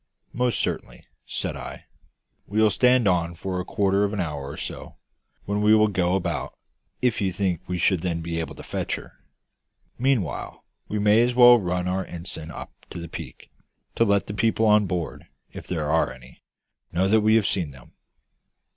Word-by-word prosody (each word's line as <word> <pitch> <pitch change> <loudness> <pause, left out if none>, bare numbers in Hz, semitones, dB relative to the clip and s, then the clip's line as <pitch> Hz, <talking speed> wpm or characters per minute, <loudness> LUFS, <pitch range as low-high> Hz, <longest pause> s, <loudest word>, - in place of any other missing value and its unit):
"Most 125 -1 +1
certainly," - - -3 0.2
said - - -3
I. - - -8 0.6
"We 105 +2 -1
will 110 -1 +5
stand 125 +1 +4
on 85 -2 +1
for 90 +2 -3
a - - -2
quarter 100 +1 +1
of 100 0 0
an 105 - -3
hour 75 -5 -3
or - - -8
so, - - -7 0.5
when 100 +1 -1
we 105 +1 +6
will 110 0 +4
go 90 -2 +1
about, 95 - -3 0.5
if 125 -4 +2
you 95 -2 +1
think 90 -3 -1
we 90 - -2
should 90 0 +2
then 85 -2 -1
be 85 0 -3
able 80 - -5
to - - -10
fetch - - -2
her. - - -10 0.9
Meanwhile, 125 - -1 0.2
we 105 - -3
may 105 +2 +5
as 120 0 +1
well 120 -1 +8
run 90 -2 -1
our 95 +1 0
ensign 85 -2 -7
up - - -8 0.2
to - - -8
the 85 -1 -7
peak, - - -9 0.4
to - - +3
let 100 -2 +2
the 105 - -6
people 110 +1 +1
on 105 -1 +5
board 85 -2 -4 0.3
if - - -9
there 80 -4 -2
are 80 -4 +2
any 65 0 -14 0.5
know 95 +3 +1
that 110 +2 +4
we 110 +1 +4
have 110 -3 +3
seen 90 -7 0
them." 65 -3 -16
95 Hz, 190 wpm, -25 LUFS, 85-105 Hz, 0.9 s, well